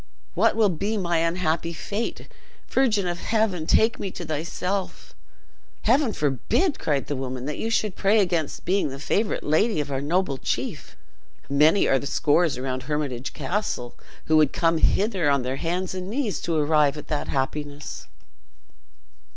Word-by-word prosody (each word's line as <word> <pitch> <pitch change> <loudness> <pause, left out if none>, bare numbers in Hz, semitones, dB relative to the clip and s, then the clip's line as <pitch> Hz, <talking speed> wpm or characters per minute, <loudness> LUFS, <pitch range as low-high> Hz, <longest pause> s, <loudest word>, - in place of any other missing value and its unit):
"What - - +3
will 220 -2 +4
be 200 +6 -1
my 175 -3 0
unhappy 165 0 0
fate! 205 +7 -4 0.4
Virgin 220 -8 +2
of 175 -1 -3
heaven, 215 -8 0
take 225 +1 +3
me 195 - -3
to 175 - -7
thyself!" 175 +5 -3 0.7
"Heaven 255 +1 +3
forbid!" 150 - 0
cried 145 -3 0
the 145 - -3
woman, 130 -1 -4
"that 150 +1 -4
you 225 - -1
should 215 -3 0
pray 210 +2 +3
against 175 -6 -1
being 190 -3 +1
the 135 - -7
favorite 205 +9 -1
lady 175 +6 +2
of 145 -1 -3
our 135 0 -1
noble 150 -2 0
chief! - - -4 0.5
Many 155 +7 +4
are 135 - +3
the 140 - -5
scores 155 0 +2
around 130 0 -3
Hermitage 140 -4 -2
Castle 175 - -3 0.3
who 155 - +4
would 150 -3 +4
come 165 -1 +2
hither 195 -6 +2
on 140 -2 +2
their 130 +2 -2
hands 180 +4 -2
and 185 0 -5
knees 220 - -1
to 170 - -1
arrive 150 -1 +3
at 150 - -8
that 150 - -2
happiness." 145 +2 -4
165 Hz, 160 wpm, -24 LUFS, 145-200 Hz, 0.7 s, will